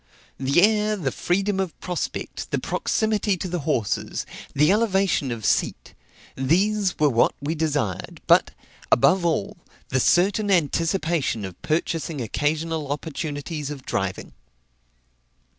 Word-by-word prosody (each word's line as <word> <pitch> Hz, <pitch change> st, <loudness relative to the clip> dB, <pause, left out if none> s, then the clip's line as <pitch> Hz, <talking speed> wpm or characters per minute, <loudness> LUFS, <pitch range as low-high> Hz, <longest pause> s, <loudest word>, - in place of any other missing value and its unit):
The 140 Hz, +6 st, +3 dB
air, 215 Hz, 0 st, +3 dB
the 155 Hz, -10 st, -2 dB
freedom 195 Hz, +6 st, 0 dB
of 190 Hz, -4 st, -3 dB
prospect, 180 Hz, -1 st, -4 dB
the -, -, 0 dB
proximity 215 Hz, -3 st, 0 dB
to 185 Hz, -, -4 dB
the 175 Hz, 0 st, -2 dB
horses, 115 Hz, -9 st, -1 dB, 0.3 s
the 150 Hz, +5 st, +4 dB
elevation 195 Hz, -, +2 dB
of 115 Hz, -4 st, -4 dB
seat -, -, 0 dB, 0.4 s
these 190 Hz, +8 st, +1 dB
were 150 Hz, -, +4 dB
what 120 Hz, -4 st, +3 dB
we 145 Hz, +3 st, -2 dB
desired; 145 Hz, -, -2 dB
but, -, -, +5 dB, 0.4 s
above 185 Hz, +9 st, +4 dB
all, 160 Hz, -12 st, -1 dB, 0.3 s
the 130 Hz, -, +1 dB
certain 200 Hz, -, +3 dB
anticipation 165 Hz, -, +1 dB
of 95 Hz, -2 st, -10 dB
purchasing 160 Hz, -1 st, -1 dB
occasional 150 Hz, +5 st, -1 dB
opportunities 150 Hz, 0 st, -4 dB
of 140 Hz, -3 st, -7 dB
driving. 95 Hz, -1 st, -3 dB
160 Hz, 125 wpm, -24 LUFS, 140-190 Hz, 0.4 s, but